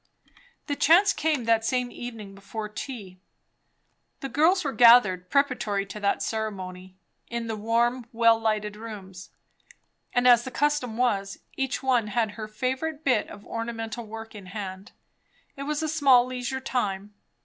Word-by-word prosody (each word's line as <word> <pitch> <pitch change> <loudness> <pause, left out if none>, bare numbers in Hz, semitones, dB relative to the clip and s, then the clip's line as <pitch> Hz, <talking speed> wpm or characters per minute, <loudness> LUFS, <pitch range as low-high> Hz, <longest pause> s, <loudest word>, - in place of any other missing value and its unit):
The 290 - -2
chance 365 +8 +5
came 305 -5 0
that 225 -1 +3
same 250 +1 -1
evening 225 -5 -8
before 210 +2 -6
tea. 210 -4 -8 1.0
The 270 - -4
girls 330 +8 +3
were 275 -3 -2
gathered, 210 -7 +6
preparatory 250 -8 +1
to 200 +2 -8
that 200 -1 0
ceremony, 185 -4 -5 0.3
in 235 -1 -4
the 225 -1 -3
warm, 235 +3 0
well 230 -1 +4
lighted 215 -2 -1
rooms; 200 -4 -9 0.8
and 245 0 +2
as 240 -1 +7
the 260 - -5
custom 270 -4 0
was, 200 -6 0 0.2
each 270 +1 -2
one 250 -5 +2
had 220 0 0
her 215 0 -7
favourite 260 +8 -3
bit 250 -6 +2
of 205 0 -12
ornamental 230 0 -5
work 225 +1 -8
in 200 -3 -10
hand. 190 -1 -7 0.6
It 275 0 -6
was 300 +1 -1
a - - 0
small 275 -6 +5
leisure 255 +1 -4
time. 210 -6 -3
230 Hz, 150 wpm, -26 LUFS, 210-255 Hz, 1.0 s, as